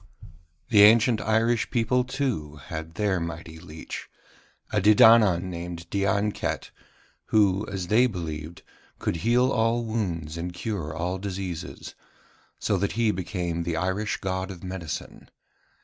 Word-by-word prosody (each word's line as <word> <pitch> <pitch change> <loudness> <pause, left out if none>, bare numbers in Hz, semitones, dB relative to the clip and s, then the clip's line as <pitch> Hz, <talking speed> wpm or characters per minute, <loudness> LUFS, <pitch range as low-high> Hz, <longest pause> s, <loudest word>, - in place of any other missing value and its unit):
The 105 -3 +6
ancient 110 +2 +6
Irish 115 +2 +1
people, 125 +1 +1
too, 125 - -3
had 80 +3 -7
their 100 -2 +1
mighty 85 -1 -6
leech, 80 -1 -8 0.6
a 105 - +1
Dedannan 105 -3 +6
named 85 -1 -6
Dianket, 100 +1 -1 0.6
who, 105 -1 +3
as 95 -3 -4
they 115 +7 +4
believed, 80 -5 -6 0.3
could - - -2
heal 120 +8 +2
all 115 +1 +1
wounds 85 -8 -3
and 90 +1 -4
cure 95 -7 -3
all 90 +4 -3
diseases; 95 -4 -5 0.6
so 105 - 0
that 100 +2 -1
he 115 -1 +2
became 90 -3 -3
the 85 -1 -2
Irish 95 +4 -1
God 95 0 -3
of 95 -2 -9
Medicine. 90 -4 -6
95 Hz, 130 wpm, -26 LUFS, 85-110 Hz, 0.6 s, The